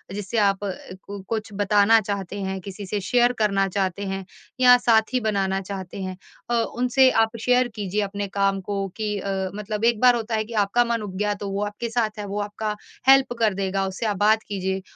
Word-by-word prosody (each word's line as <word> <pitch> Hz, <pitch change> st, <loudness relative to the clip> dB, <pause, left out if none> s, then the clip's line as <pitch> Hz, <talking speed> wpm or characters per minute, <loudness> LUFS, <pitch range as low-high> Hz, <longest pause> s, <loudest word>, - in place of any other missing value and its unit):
जिससे 205 Hz, +3 st, -4 dB
आप 200 Hz, -2 st, +3 dB
क 195 Hz, 0 st, -7 dB
कुछ 220 Hz, -1 st, -2 dB
बताना 205 Hz, +2 st, +4 dB
चाहते 200 Hz, -1 st, -4 dB
हैं, 190 Hz, 0 st, -3 dB
किसी 200 Hz, +1 st, -8 dB
से 205 Hz, +2 st, -2 dB
शेयर 245 Hz, +5 st, +3 dB
करना 195 Hz, -2 st, +2 dB
चाहते 195 Hz, +1 st, -2 dB
हैं, 195 Hz, 0 st, -4 dB, 0.4 s
या 250 Hz, 0 st, +8 dB
साथी 235 Hz, +1 st, +2 dB
बनाना 195 Hz, -2 st, 0 dB
चाहते 190 Hz, 0 st, -7 dB
हैं, 185 Hz, -1 st, -5 dB, 0.3 s
अ, -, -, 0 dB
उनसे 245 Hz, +3 st, +3 dB
आप 225 Hz, +1 st, -4 dB
शेयर 250 Hz, +1 st, +3 dB
कीजिए 205 Hz, 0 st, -2 dB
अपने 200 Hz, 0 st, -3 dB
काम 195 Hz, 0 st, 0 dB
को 195 Hz, 0 st, -3 dB
कि 210 Hz, -2 st, -2 dB
अ, 195 Hz, -, -3 dB, 0.2 s
मतलब 210 Hz, +1 st, -3 dB
एक 235 Hz, -2 st, +3 dB
बार 250 Hz, -1 st, +6 dB
होता 225 Hz, -1 st, -2 dB
है 215 Hz, -, 0 dB
कि 230 Hz, -, -10 dB
आपका 240 Hz, +5 st, +2 dB
मन 235 Hz, -1 st, -1 dB
उब 195 Hz, -3 st, -7 dB
गया 210 Hz, +1 st, 0 dB
तो 200 Hz, -, -3 dB
वो 200 Hz, +1 st, -1 dB
आपके 210 Hz, +3 st, -5 dB
साथ 225 Hz, -2 st, -1 dB
है, 205 Hz, -, -4 dB
वो 200 Hz, +1 st, -4 dB
आपका 210 Hz, +1 st, -3 dB, 0.3 s
हेल्प 270 Hz, -2 st, +6 dB
कर 220 Hz, -3 st, +3 dB
देगा, 195 Hz, 0 st, -1 dB
उससे 190 Hz, +4 st, -4 dB
आप 205 Hz, -2 st, -1 dB
बात 220 Hz, 0 st, +3 dB
कीजिए 190 Hz, -1 st, -2 dB
205 Hz, 210 wpm, -23 LUFS, 195-225 Hz, 0.4 s, या